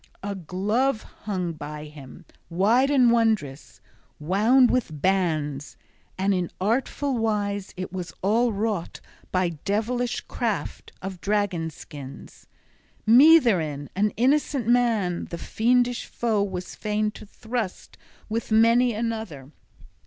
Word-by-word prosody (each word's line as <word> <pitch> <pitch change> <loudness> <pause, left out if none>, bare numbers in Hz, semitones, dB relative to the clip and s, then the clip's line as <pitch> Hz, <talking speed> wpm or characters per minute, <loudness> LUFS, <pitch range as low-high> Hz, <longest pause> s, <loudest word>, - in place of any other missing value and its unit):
A 200 0 -3
glove 210 - -1
hung 185 -5 -4
by 150 0 -7
him 150 -3 -12 0.2
{28f} 165 - -10
wide 235 +8 +4
and 255 -5 +5
wondrous, 220 - 0 0.4
wound 220 - +4
with 175 -12 -1
bands; 155 -6 -1 0.4
and 195 +1 +1
in 180 -2 -1
artful 250 +5 0
wise 205 -3 -1
it 185 0 -3 0.4
all 225 +5 +3
was - - -3
wrought, 205 -5 -2 0.3
by 185 -1 +1
devilish 220 +9 -2
craft, - - -4
of 190 -2 -6
dragon 200 -5 0
skins. 140 -3 -11 0.6
Me 275 +9 +8
therein, 160 - 0
an 205 +2 +2
innocent 265 0 +1
man, 230 -8 +2
the 170 - -7
fiendish 245 +6 +1
foe 225 -3 0
was 185 -2 -4
fain 210 0 -1
to 215 - -12
thrust 225 -2 -5 0.3
with 225 +1 -3
many 230 +2 +4
another. 215 - -4
210 Hz, 125 wpm, -25 LUFS, 175-235 Hz, 0.6 s, Me